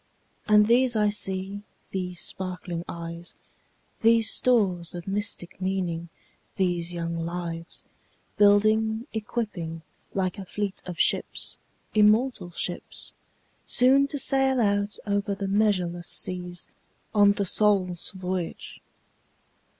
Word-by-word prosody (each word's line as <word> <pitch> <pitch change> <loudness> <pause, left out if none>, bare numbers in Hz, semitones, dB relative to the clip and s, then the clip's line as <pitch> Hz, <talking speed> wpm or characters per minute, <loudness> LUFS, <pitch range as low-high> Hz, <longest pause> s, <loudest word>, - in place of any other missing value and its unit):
And 210 -1 +6
these 240 +2 +4
I 210 -1 +3
see, 195 -1 -2 0.3
these 180 -2 -3
sparkling 180 -2 -3
eyes, 170 0 -7 0.7
These 225 0 +5
stores 190 -9 +2
of 175 0 -6
mystic 195 -3 -3
meaning, 180 -3 -2 0.5
these 175 -3 0
young 170 -1 -3
lives, 170 0 -5 0.5
Building, 215 +2 +4
equipping 205 -7 -4 0.3
like 185 -1 -1
a 195 - -6
fleet 205 +1 -3
of 180 -2 -6
ships, - - 0 0.3
immortal 215 -2 +3
ships, 175 +1 -4 0.5
Soon 270 +3 +5
to 285 - -4
sail 270 -1 +3
out 205 -1 +1
over 200 -1 0
the 195 0 -3
measureless 185 -4 +1
seas, 180 -1 -3 0.5
On 205 -1 +6
the 200 0 -1
soul's 185 -3 +1
voyage. 185 -2 -5
195 Hz, 110 wpm, -26 LUFS, 175-210 Hz, 0.7 s, And